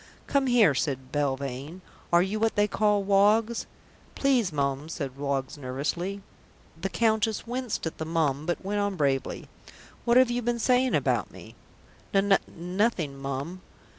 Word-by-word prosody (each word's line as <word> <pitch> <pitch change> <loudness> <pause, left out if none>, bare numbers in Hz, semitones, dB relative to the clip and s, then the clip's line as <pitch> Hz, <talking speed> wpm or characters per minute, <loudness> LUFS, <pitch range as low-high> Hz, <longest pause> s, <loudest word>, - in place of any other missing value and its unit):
"Come 275 -1 +1
here," 235 - +5
said 135 -2 -2
Belvane. 140 +3 -3 0.3
"Are 170 +1 +5
you 200 +3 -2
what 225 0 +1
they 205 -1 +3
call 210 -1 +2
Woggs?" 210 +4 +3 0.5
"Please, 255 -9 +2
Mum," 140 0 -1
said 140 -6 -5
Woggs 140 0 -3
nervously. 165 +9 -3 0.5
The 180 +4 -4
Countess 220 -1 +1
winced 245 -3 -3
at 160 - -5
the 160 - -2
"Mum," 155 -3 0
but 175 +2 -2
went 205 +1 -1
on 205 -1 0
bravely. 140 -5 -1 0.6
"What 235 0 +4
have 255 -1 +5
you 245 +1 0
been 240 0 0
saying 250 +2 +2
about - - +1
me?" - - -13 0.6
"N 195 0 +5
Nothing, 180 -3 -1
Mum." 140 +6 -5
185 Hz, 150 wpm, -27 LUFS, 140-220 Hz, 0.6 s, here